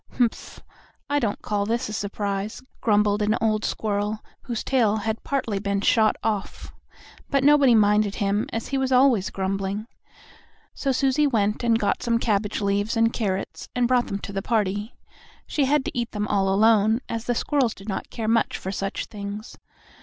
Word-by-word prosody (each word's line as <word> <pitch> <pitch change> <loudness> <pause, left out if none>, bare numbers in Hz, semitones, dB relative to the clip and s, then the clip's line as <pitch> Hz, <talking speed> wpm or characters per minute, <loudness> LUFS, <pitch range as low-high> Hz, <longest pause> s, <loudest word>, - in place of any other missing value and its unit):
"Humph! 240 -3 -1 0.5
I 290 - +3
don't 220 -6 -2
call 205 -1 -1
this 235 +2 -1
a 210 - -6
surprise," 205 +2 -3 0.2
grumbled 210 -1 +2
an 210 +2 +2
old 215 -1 +1
squirrel, 210 0 -1 0.3
whose 235 -4 -3
tail 230 -6 +2
had 220 +1 -3
partly 235 -8 -1
been 200 0 -1
shot 220 +1 +3
off. 210 -3 -3 0.6
But 275 -1 +2
nobody 285 -4 +6
minded 210 -1 +3
him, 205 0 0
as 225 - -4
he 275 - 0
was 265 0 -1
always 250 -6 +4
grumbling. 195 +2 -2 0.9
So 275 - -1
Susie 270 +3 +2
went 210 -4 0
and 230 -1 +3
got 210 - 0
some 235 -1 +1
cabbage 215 -3 0
leaves 205 +3 0
and 230 0 +3
carrots, 195 -4 -3
and 245 -1 +2
brought 245 -1 +2
them 200 - -3
to 200 - -7
the 195 - -2
party. 210 0 -1 0.5
She 290 - 0
had 285 0 +2
to - - -5
eat 235 -2 -2
them 210 -1 -2
all 195 -1 +2
alone, 220 +2 +4
as 230 0 -4
the 245 - 0
squirrels 260 -3 +1
did 195 - -13
not 195 - -4
care 225 -2 -4
much 230 +1 +2
for 190 - -5
such 195 0 -3
things. 205 +1 -7
215 Hz, 180 wpm, -24 LUFS, 205-240 Hz, 0.9 s, nobody